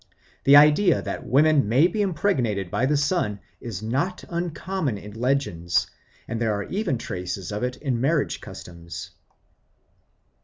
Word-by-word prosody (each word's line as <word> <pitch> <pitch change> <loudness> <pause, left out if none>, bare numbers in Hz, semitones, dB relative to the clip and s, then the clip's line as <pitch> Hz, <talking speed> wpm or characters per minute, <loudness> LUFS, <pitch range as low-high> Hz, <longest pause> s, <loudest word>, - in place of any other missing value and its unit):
The 140 - +8
idea 150 +5 +6
that - - -5
women 145 -4 +4
may 130 +8 +5
be 195 +4 0
impregnated 130 - 0
by 120 +6 +1
the 150 +1 +2
sun 145 - 0 0.2
is 110 -4 -6
not 140 - -1
uncommon 170 - -2
in 105 +1 -10
legends, 115 -9 0 0.4
and 115 0 -4
there 110 -2 +1
are 100 - -3
even 185 - -2
traces 90 -2 -5
of 105 - -3
it 125 0 -2
in 130 -5 -2
marriage 150 +2 0
customs. 85 -1 -9
130 Hz, 145 wpm, -24 LUFS, 105-155 Hz, 0.4 s, The